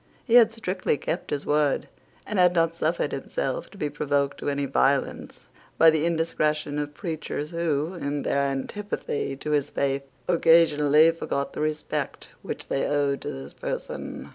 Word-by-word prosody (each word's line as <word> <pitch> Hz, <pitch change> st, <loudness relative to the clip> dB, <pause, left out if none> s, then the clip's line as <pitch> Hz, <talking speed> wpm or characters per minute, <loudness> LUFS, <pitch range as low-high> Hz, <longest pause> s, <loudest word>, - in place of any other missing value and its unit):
He 235 Hz, -, -1 dB
had 235 Hz, -2 st, +8 dB
strictly 185 Hz, -8 st, -1 dB
kept 165 Hz, +5 st, -3 dB
his 145 Hz, -1 st, -2 dB
word, 150 Hz, -1 st, +1 dB, 0.4 s
and 210 Hz, -2 st, -2 dB
had 180 Hz, 0 st, +5 dB
not 165 Hz, 0 st, +2 dB
suffered 165 Hz, +1 st, 0 dB
himself -, -, -3 dB
to 200 Hz, -, -15 dB
be 150 Hz, -, -1 dB
provoked 145 Hz, -1 st, -1 dB
to -, -, -2 dB
any 140 Hz, 0 st, -1 dB
violence 135 Hz, +1 st, 0 dB, 0.3 s
by 160 Hz, 0 st, +7 dB
the 155 Hz, +1 st, +1 dB
indiscretion 155 Hz, -3 st, 0 dB
of 145 Hz, 0 st, -4 dB
preachers 155 Hz, -4 st, -4 dB
who, 165 Hz, -1 st, -1 dB
in 145 Hz, -4 st, -3 dB
their 140 Hz, -, +1 dB
antipathy 140 Hz, +1 st, -2 dB
to 150 Hz, -, -4 dB
his 145 Hz, -2 st, +1 dB
faith, 140 Hz, 0 st, 0 dB, 0.3 s
occasionally 160 Hz, -2 st, +5 dB
forgot 140 Hz, -4 st, -3 dB
the -, -, -4 dB
respect 155 Hz, 0 st, -3 dB
which -, -, -6 dB
they 135 Hz, -, 0 dB
owed 140 Hz, -1 st, +1 dB
to -, -, -4 dB
his 65 Hz, +1 st, -8 dB
person. -, -, -5 dB
150 Hz, 165 wpm, -26 LUFS, 140-165 Hz, 0.4 s, had